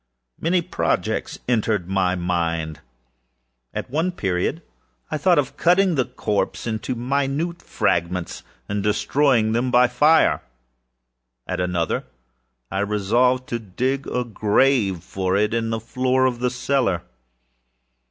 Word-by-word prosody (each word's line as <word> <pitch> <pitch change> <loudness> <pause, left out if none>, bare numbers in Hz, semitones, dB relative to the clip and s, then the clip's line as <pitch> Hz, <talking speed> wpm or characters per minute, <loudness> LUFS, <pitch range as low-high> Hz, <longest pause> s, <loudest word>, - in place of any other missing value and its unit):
Many 175 +2 +1
projects - - -1
entered 110 -6 +1
my 95 -1 +1
mind. 85 -3 -2 0.9
At - - -5
one 165 +6 0
period 95 - -1 0.5
I 155 - -1
thought 180 +3 +4
of 140 -3 0
cutting 180 +1 +4
the 130 -5 +1
corpse 105 -5 -2
into 110 +2 -3
minute 140 +7 -1
fragments, 85 +1 -1 0.3
and 105 0 -2
destroying 110 +2 +2
them 120 +3 +1
by 125 0 +5
fire. 150 +6 +4 1.0
At - - -3
another, 90 -2 -1 0.7
I 95 - -1
resolved 115 +6 +1
to 120 - -2
dig 130 +7 -2
a 125 - -1
grave 110 - +2
for 95 0 -1
it 105 +2 +1
in 115 -1 0
the 115 0 -1
floor 130 +3 +1
of 125 -2 0
the 125 0 +1
cellar. 125 -8 0
120 Hz, 125 wpm, -22 LUFS, 95-135 Hz, 1.0 s, by